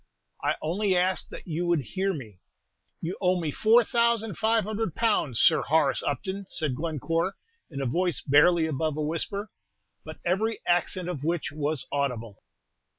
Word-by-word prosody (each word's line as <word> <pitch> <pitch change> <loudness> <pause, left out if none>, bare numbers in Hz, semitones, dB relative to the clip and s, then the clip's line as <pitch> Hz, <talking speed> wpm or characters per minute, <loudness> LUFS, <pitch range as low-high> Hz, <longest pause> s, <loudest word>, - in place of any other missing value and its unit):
_" - - +3
"I - - +2
only 185 +4 +1
ask 185 +1 0
that - - -9
you 175 +1 -2
would 170 -3 +2
hear 190 - -2
me." 110 - -8 0.6
"You 170 +3 -4
owe 180 -1 +2
me 160 -3 -2
four 225 - +5
thousand 235 -3 +1
five 220 +1 +2
hundred 215 -3 -3
pounds, 205 - +1
Sir 160 - +6
Horace 145 -3 +2
Upton," 190 +8 -3
said 155 -4 -1
Glencore, 165 +4 -1 0.3
in 140 -4 -5
a - - -1
voice 175 +7 0
barely 160 +4 +4
above 155 0 -1
a 155 - -1
whisper, 200 +7 -2 0.5
but - - -9
every 215 +6 0
accent 175 +1 +1
of 165 -6 -4
which 165 +1 -1
was 150 -1 -2
audible. 125 -7 -2
170 Hz, 165 wpm, -27 LUFS, 150-195 Hz, 0.6 s, Sir